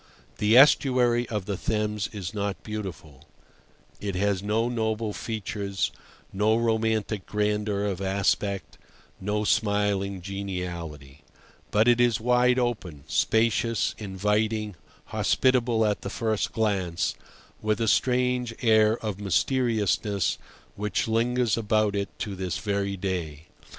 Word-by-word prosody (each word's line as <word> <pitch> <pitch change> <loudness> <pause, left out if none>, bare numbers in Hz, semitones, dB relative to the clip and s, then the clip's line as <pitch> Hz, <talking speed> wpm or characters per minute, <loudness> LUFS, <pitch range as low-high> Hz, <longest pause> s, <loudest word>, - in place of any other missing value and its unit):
The 105 +3 +4
estuary 125 -4 +5
of 105 -4 -3
the 100 - -2
Thames 105 0 -1
is 100 -2 -6
not 100 -1 -3
beautiful; 90 -10 -7 0.7
it 100 -2 -3
has 100 0 +1
no 110 +3 0
noble 110 -2 -1
features, 100 -3 -3 0.4
no 105 +3 +2
romantic 110 -3 0
grandeur 105 -1 0
of 100 -2 -2
aspect, 100 0 -1 0.4
no 105 +2 -1
smiling 100 -2 +1
geniality; 85 -8 -6 0.5
but 105 +3 +3
it 120 0 +5
is 120 -2 +3
wide 125 +2 +3
open, 105 - -2
spacious, 110 +6 +1
inviting, 105 +1 -1 0.4
hospitable 120 -3 +2
at 105 -1 0
the - - -5
first 110 -2 -1
glance, 95 -6 0 0.5
with 110 -1 0
a 115 - 0
strange 125 +1 +1
air 110 -1 +4
of 105 -2 -3
mysteriousness 105 -2 +1 0.4
which 105 +2 -1
lingers 120 0 +1
about 110 -2 +1
it 100 0 -1
to 100 -3 -4
this 95 -2 -3
very 100 -1 -2
day. 85 -5 -4
105 Hz, 120 wpm, -26 LUFS, 100-115 Hz, 0.7 s, estuary